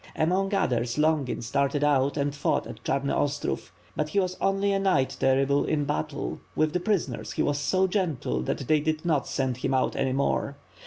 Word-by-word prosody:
Among 185 +5 +1
others, 120 -9 0
Longin 150 -5 +1
started 140 +4 0
out 140 -1 +2
and 140 0 0
fought 145 - 0
at - - -10
Chamy 140 +1 0
Ostrov; 145 0 -2 0.2
but 150 0 -1
he 200 - +1
was 185 -1 -1
only 195 +1 +2
a 195 - +1
knight 185 -9 +1
terrible 135 +2 +3
in 150 -2 0
battle; 150 0 -3 0.2
with 155 0 +1
the 180 - +1
prisoners 175 - -1
he - - 0
waa - - +2
so 145 +7 +1
gentle 170 - -1
that 120 - -3
they 155 -1 +4
did 155 +2 -2
not 155 -5 +1
send 130 -3 -1
him 130 +1 -1
out 130 - +1
any 135 -1 0
more. 140 +1 0
145 Hz, 195 wpm, -27 LUFS, 135-170 Hz, 0.2 s, they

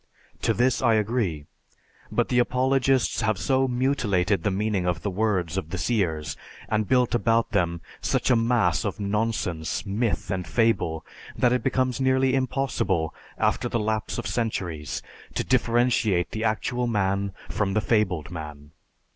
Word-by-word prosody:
To - - +2
this 125 +1 +2
I 115 - +4
agree; 105 -9 0 0.7
but - - +1
the 125 - +3
apologists 130 0 +2
have 110 -3 +1
so 130 +5 +1
mutilated 120 -8 +1
the 105 - +1
meaning 100 -2 0
of 85 -1 -1
the 100 - -1
words 95 -4 0
of 80 - -8
the - - -3
seers 80 - -1 0.3
and 110 -1 0
built 125 -2 +2
about 115 -1 +2
them 85 -5 0 0.2
such - - +1
a - - +6
mass 115 0 +2
of 105 0 -3
nonsense, 105 -6 -1
myth, 105 +3 -1
and 90 -3 -2
fable 80 -5 +1 0.3
that 125 0 +3
it 125 - +1
becomes 130 -1 0
nearly 130 0 +3
impossible 130 - 0 0.2
after - - +1
the 115 - 0
lapse 110 -1 -2
of - - -4
centuries 95 - -3 0.3
to - - 0
differentiate 120 -6 +2
the 110 +1 -2
actual 120 +3 0
man 100 -2 0 0.2
from 100 -1 -1
the - - +4
fabled 100 -8 0
man. 75 -3 -8
110 Hz, 155 wpm, -25 LUFS, 90-120 Hz, 0.7 s, a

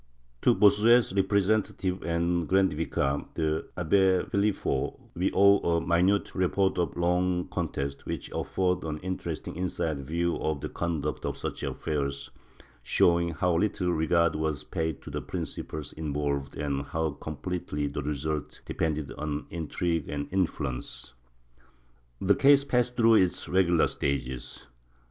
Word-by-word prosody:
To - - +4
Bossuet's 105 +3 +5
representative 95 -1 +1
and 85 0 0
grand 95 -2 +3
vicar, 70 -2 -1
the 80 0 -1
Abbe 95 +1 +3
Phelip 100 +1 +2
peaux, 65 - -2
we 90 +3 0
owe 100 +1 +6
a 85 -1 +1
minute 85 +4 +2
report 95 0 +1
of 85 - -1
the - - -6
long 90 +1 +1
contest, 70 0 -3
which - - -5
affords 90 -1 0
an 80 -1 -3
interesting 95 0 -4
inside 80 -4 -2
view 85 +4 -1
of 75 -3 -2
the - - -4
conduct 85 -3 -3
of - - -3
such - - -5
affairs, 70 -3 -3 0.5
showing 85 +7 +3
how 85 +2 0
little 90 -1 +1
regard 85 +1 +2
was 75 -2 -2
paid 80 -3 -3
to - - -8
the - - -3
principles 75 -2 -5
involved 70 -2 -2
and 70 -1 -1
how 80 +2 -2
completely 75 +1 -4
the 70 +1 -3
result 75 +1 -3
depended 75 -4 -2
on 75 -1 -3
intrigue 85 -1 -2
and 70 0 -3
influence. 70 -9 -2 1.1
The 95 +1 +4
case 140 +5 +5
passed 125 -2 0
through 115 -2 +6
its 90 -1 0
regular 90 -3 +3
stages. 65 -3 -3
85 Hz, 140 wpm, -28 LUFS, 75-95 Hz, 1.1 s, owe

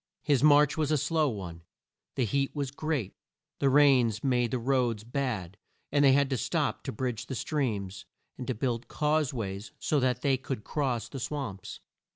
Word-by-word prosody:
His 145 -4 +2
march 150 0 +5
was 155 -2 0
a 155 - +3
slow 155 +1 +1
one; 90 -7 -6 0.5
the 130 - +1
heat 135 +6 -1
was 140 -3 -2
great; 140 -8 -2 0.5
the 140 - +3
rains 130 -6 +4
made 125 -3 +2
the 130 - -1
roads 120 -3 0
bad, 115 -7 -3 0.3
and 145 0 +3
they 135 -2 +7
had 140 0 +3
to 130 - +1
stop - - -1
to - - -2
bridge 125 -1 -3
the 130 - -4
streams, 105 - -2 0.3
and - - -7
to - - -1
build 120 0 -2
cause 150 0 +1
ways 100 -5 -5
so 150 - +1
that 125 -1 0
they 135 -2 +3
could 130 -3 -5
cross 130 -6 -1
the 135 - -7
swamps. 130 -8 -5
130 Hz, 185 wpm, -29 LUFS, 115-145 Hz, 0.5 s, they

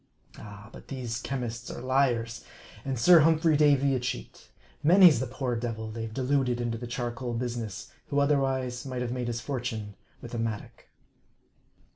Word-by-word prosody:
Ah! 105 +1 -11
but - - -12
these 120 -3 -4
chemists 125 -3 -4
are - - -6
liars, 120 -3 +1 0.4
and 135 -2 -2
Sir 170 +8 +7
Humphrey 160 0 +4
Davy 140 -2 +4
a 130 - +1
cheat. 125 0 -6 0.3
Many's 170 -2 +7
the 130 - -2
poor 130 -1 -2
devil 115 -2 -4
they've 115 0 -5
deluded 130 0 0
into 115 -1 -2
the 120 - -6
charcoal 120 0 -3
business, 120 -1 -4 0.2
who 140 - -2
otherwise 135 -3 +1
might 130 -2 -4
have 120 - -3
made 125 -1 -3
his 115 -1 -3
for 135 -1 -3
tune 110 -4 -5 0.3
with 120 - -10
a 120 - -2
mattock. 110 -2 -5
125 Hz, 165 wpm, -28 LUFS, 115-135 Hz, 0.4 s, Sir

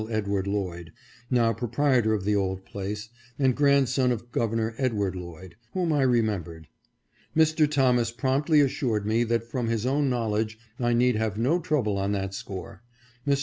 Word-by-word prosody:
Edward 100 -3 -1
Lloyd, 90 -5 -3 0.4
now 115 -3 +3
proprietor 120 0 +1
of 100 - -3
the 105 0 +2
old 95 -1 -1
place, 105 +2 -5 0.3
and 130 -3 +2
grandson 135 -3 +3
of 120 0 -4
Governor 115 -1 -1
Ed. 130 -4 +1
Lloyd, 90 -3 -4 0.2
whom 175 -4 0
I 145 - +2
remembered. 105 - 0 0.7
Mr. 155 -1 +4
Thomas 125 -5 +2
promptly 140 +5 +2
assured 130 -7 0
me 110 +2 +2
that 115 0 0
from 120 0 -3
his 115 0 -1
own 140 +2 +1
knowledge 110 -3 -1 0.2
I 120 -1 +1
need 125 -1 +3
have 110 -2 -1
no 135 +10 +2
trouble 125 - 0
on 100 +1 0
that 95 -1 -2
score. 95 0 -7 0.5
Mr. 140 -1 +3
115 Hz, 160 wpm, -26 LUFS, 100-130 Hz, 0.7 s, Mr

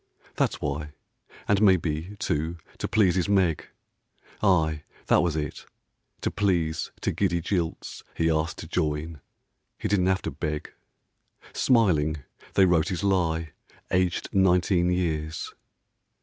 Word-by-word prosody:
That's - - 0
why; 75 +1 -3 0.5
and 100 0 +3
maybe, 90 -2 +2
too, 80 -4 -2 0.2
to - - -2
please 100 -5 +3
his 90 +2 0
Meg, 95 -6 +2 0.7
Aye, 80 -7 +2 0.2
that - - +4
was 85 -3 0
it, 75 -3 -4 0.5
to - - -1
please 85 -6 0
to - - 0
giddy 90 -4 0
jilts 85 -1 -3
He 80 - +1
asked 80 0 0
to - - -8
join. 75 0 -2 0.6
He - - -3
didn't 95 -3 +2
have 95 0 +1
to - - -3
beg; 75 -1 -4 0.8
Smiling 80 - +2 0.3
they 95 - +6
wrote 85 -3 +3
his 95 +1 -3
lie; 85 -5 +1 0.4
aged 90 -1 +1
nineteen 90 -1 +3
years. 80 -3 -2
85 Hz, 130 wpm, -26 LUFS, 80-95 Hz, 0.8 s, they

